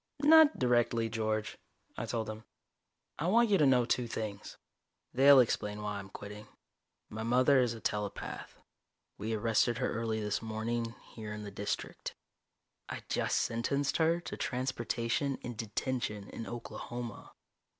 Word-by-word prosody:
"Not 315 0 +8
directly, 120 -2 +2
George," 110 -1 -2 0.4
I - - -4
told 115 -2 -2
him. 110 0 -6 0.8
"I 160 - 0
want 230 +3 +4
you 195 - +5
to 150 - +5
know 125 -2 +4
two 125 0 0
things. 110 -3 -5 0.6
They'll 135 +2 +8
explain 105 -3 +1
why 105 -1 -3
I'm 95 -1 -9
quitting. 105 +2 -9 0.6
My 110 - -5
mother 130 +4 +4
is 120 -2 +1
a - - -8
telepath. 105 -2 -4 0.6
We 110 +2 -1
arrested 115 +2 +2
her - - -1
early 115 -1 -1
this 105 -1 -1
morning, 115 +1 -2 0.2
here 110 -2 -6
in 105 0 -6
the 100 - -7
District. 100 +1 -4 0.7
I - - -5
just - - +1
sentenced 140 +5 0
her 165 +1 +3
to - - -6
transportation 125 +1 -1
and 120 -1 -5
detention 110 -1 -3
in 115 - -6
Oklahoma." 120 -1 -7
115 Hz, 145 wpm, -32 LUFS, 110-130 Hz, 0.8 s, Not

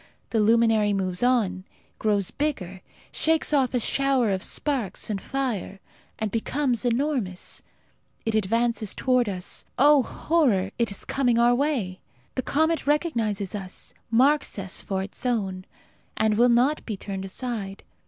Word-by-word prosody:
The 225 - +1
luminary 220 -1 +4
moves 185 -2 -1
on, 220 -7 +2 0.4
grows 205 -3 +1
bigger, 190 - -3 0.3
shakes 320 -1 +1
off 265 -3 +2
a - - +3
shower 265 -2 +1
of 190 -1 -1
sparks 245 -5 -2
and 195 -2 -3
fire, 245 -8 -3 0.4
and 220 -2 -2
becomes 250 +1 0
enormous. 245 -6 -1 0.6
It 225 - 0
advances 225 +1 +1
towards 250 -4 +2
us. 180 -2 -3
Oh, 290 +1 +6
horror, 245 - +1
it 235 - +2
is 200 - -6
coming 245 -4 +1
our 240 +1 +5
way! 245 -9 -1 0.3
The - - -1
comet 315 +4 0
recognizes 230 - 0
us, 195 -3 -4 0.2
marks 270 +5 +3
us 195 -1 -2
for 190 -1 -2
its 195 - -8
own, 195 -7 -1 0.5
and 215 -1 +2
will 240 +3 +5
not 250 +6 +3
be 215 -4 -5
turned 195 -1 -5
aside. 200 -2 -5
230 Hz, 145 wpm, -25 LUFS, 195-265 Hz, 0.6 s, Oh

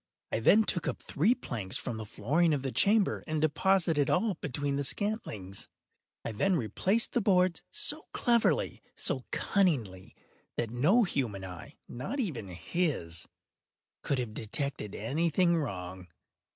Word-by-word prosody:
I - - 0
then 210 - +6
took 175 -5 -1
up - - -3
three 205 - +2
planks 110 - -3
from 115 - -4
the 110 -1 -6
flooring 150 +11 +2
of 135 - -4
the 135 - -2
chamber, 205 - +3
and 155 -1 -1
deposited 160 -1 +2
all 205 +3 +2
between 145 -2 -3
the 140 - -1
scantlings. 135 - -3 0.6
I 115 - -2
then 185 - +1
replaced 185 - +1
the 240 - +2
boards 185 -3 +3
so - - 0
cleverly, 240 - +2
so - - -1
cunningly, 125 - 0 0.4
that 115 -2 -1
no 165 - +4
human 115 - -2
eye—not 120 - -7
even 160 - -2
his—could 90 - -4
have 120 -4 -3
detected 110 -1 -3
any 150 +11 0
thing 170 +2 +3
wrong. 90 - -4
145 Hz, 140 wpm, -30 LUFS, -, 0.6 s, then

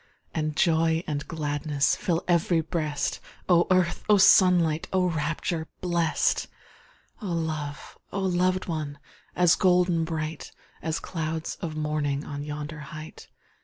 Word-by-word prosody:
And 155 -1 -2
joy 165 0 +3
and 150 -3 -3
gladness 145 -2 0
Fill 175 -5 -1
ev'ry 170 -1 +3
breast! 155 -3 -2 0.3
Oh 175 -1 +4
earth! 185 -2 +2
oh 210 - +7
sunlight! 175 -5 +5
Oh 185 -1 +2
rapture 160 +1 -2
blest! 170 -3 +1 0.7
Oh 210 - -5
love! 155 -3 -4
oh 195 - -2
loved 185 0 +1
one! 155 -4 -4 0.4
As 180 -1 +5
golden 180 -3 +3
bright, 160 -1 -4 0.3
As 160 0 -2
clouds 160 -1 -3
of 165 -4 -4
morning 150 -2 -1
On 145 -1 -5
yonder 150 +1 -6
height! 155 +1 -10
160 Hz, 130 wpm, -26 LUFS, 150-175 Hz, 0.7 s, oh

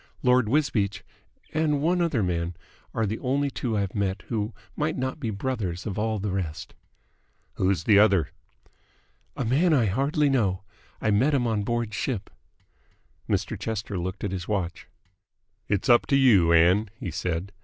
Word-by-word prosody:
Lord 125 -3 +4
Wisbeach 115 -8 0 0.5
and 155 -2 +1
one 175 +4 +1
other 155 -11 +1
man 85 -1 -2 0.4
are 115 - 0
the 105 +2 -3
only 140 +2 0
two 115 -5 -2
I've 100 -2 -1
met 100 -2 -2
who 110 -1 -1 0.2
might 155 +1 -1
not 130 +3 -3
be 120 -6 -3
the 105 - -4
brothers 100 -7 -3
of 105 -1 -3
all 110 0 0
the 100 0 -3
rest." 85 -3 -4 0.8
"Who's 95 -3 0
the 100 0 +5
other?" 100 -5 +4 1.1
"A 135 - -1
man 155 +8 +3
I 120 -5 +3
hardly 140 - +1
know. 105 -9 +1 0.4
I 110 - +1
met 130 +9 +3
him 125 -3 +1
on 110 -3 0
board 120 0 -2
ship 110 -2 -3 0.5
" - - -37
Mr. - - 0
Chester 110 -2 -4
looked 95 +2 -5
at 100 - -1
his 90 -2 -4
watch. 90 -5 -3 0.8
"It's 100 -2 0
up 120 -2 +5
to 140 - +3
you, 110 -11 +5
Ann," 90 +6 +4
he 95 -10 -4
said. 90 +2 -3
105 Hz, 170 wpm, -26 LUFS, 95-130 Hz, 1.1 s, the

